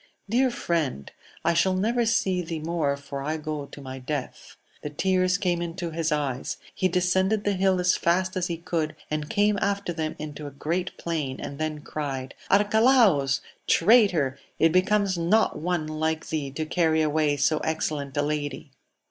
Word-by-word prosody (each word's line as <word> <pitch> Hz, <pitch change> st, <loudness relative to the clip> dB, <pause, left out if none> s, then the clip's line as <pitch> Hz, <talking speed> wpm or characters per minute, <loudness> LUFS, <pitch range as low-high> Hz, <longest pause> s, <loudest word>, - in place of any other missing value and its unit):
Dear 250 Hz, +5 st, +3 dB
friend, 160 Hz, -, -2 dB, 0.3 s
I 170 Hz, -, +4 dB
shall 185 Hz, +3 st, +2 dB
never 230 Hz, +5 st, +1 dB
see 190 Hz, -5 st, +1 dB
thee 165 Hz, -1 st, -4 dB
more, 155 Hz, -3 st, -1 dB
for 140 Hz, -1 st, -6 dB
I 155 Hz, +3 st, -2 dB
go 155 Hz, -2 st, -4 dB
to 145 Hz, -, -11 dB
my 130 Hz, -1 st, -7 dB
death. 135 Hz, +1 st, -5 dB, 0.2 s
The 150 Hz, -, -4 dB
tears 185 Hz, +3 st, +1 dB
came 180 Hz, -3 st, 0 dB
into 170 Hz, 0 st, -4 dB
his 160 Hz, 0 st, -1 dB
eyes; 140 Hz, -4 st, -2 dB, 0.2 s
he 185 Hz, -, +1 dB
descended 190 Hz, +3 st, +1 dB
the 205 Hz, -, +1 dB
hill 190 Hz, -1 st, +2 dB
as 180 Hz, 0 st, +3 dB
fast 185 Hz, +2 st, +1 dB
as 180 Hz, -1 st, 0 dB
he 170 Hz, -, -3 dB
could, 160 Hz, -2 st, -2 dB, 0.2 s
and 150 Hz, -1 st, -2 dB
came 205 Hz, -1 st, +2 dB
after 200 Hz, -3 st, -1 dB
them 160 Hz, -2 st, -3 dB
into 150 Hz, -1 st, -6 dB
a 140 Hz, -1 st, -11 dB
great 175 Hz, +5 st, -2 dB
plain, 150 Hz, -6 st, -3 dB
and 140 Hz, -, -6 dB
then 155 Hz, -1 st, -2 dB
cried, 135 Hz, -3 st, -4 dB, 0.2 s
Arcalaus! 205 Hz, -, +4 dB, 0.3 s
traitor! 170 Hz, -, +4 dB, 0.2 s
it 165 Hz, -, +4 dB
becomes 185 Hz, +1 st, +2 dB
not 170 Hz, 0 st, +2 dB
one 170 Hz, 0 st, -1 dB
like 155 Hz, +1 st, -2 dB
thee 150 Hz, -3 st, -2 dB
to 155 Hz, +4 st, -4 dB
carry 160 Hz, -1 st, +2 dB
away 150 Hz, -1 st, +1 dB
so 150 Hz, +3 st, +2 dB
excellent 150 Hz, -3 st, -2 dB
a 145 Hz, -, +2 dB
lady 145 Hz, -1 st, -3 dB
165 Hz, 175 wpm, -26 LUFS, 150-185 Hz, 0.3 s, I